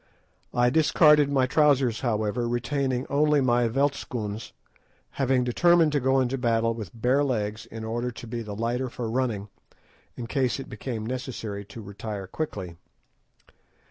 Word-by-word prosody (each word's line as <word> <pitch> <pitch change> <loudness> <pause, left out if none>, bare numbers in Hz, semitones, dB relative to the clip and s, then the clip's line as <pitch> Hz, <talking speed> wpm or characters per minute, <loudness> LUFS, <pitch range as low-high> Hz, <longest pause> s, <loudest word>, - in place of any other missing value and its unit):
I 120 0 +3
discarded 150 -1 +5
my 135 -2 +3
trousers, 135 -4 +3
however, 115 0 -1
retaining 130 +1 -1
only 150 +1 +3
my 120 -2 +3
veldtschoons, 115 -4 -2 0.6
having 130 -2 +1
determined 165 +6 +4
to 145 - +1
go 130 +1 +2
into 130 +1 0
battle 115 -1 +1
with 115 0 -8
bare 130 +5 +3
legs, 110 -4 -2
in 115 -1 -8
order 120 +2 -2
to 120 - -9
be 120 +1 -4
the 105 -2 -6
lighter 120 +4 -1
for 120 -1 -5
running, 115 -5 -1 0.7
in 120 - -5
case 130 +1 0
it 135 - -8
became 110 0 -5
necessary 115 -5 -5
to 115 +2 -10
retire 100 0 -6
quickly. 95 - -5
120 Hz, 145 wpm, -26 LUFS, 110-135 Hz, 0.7 s, discarded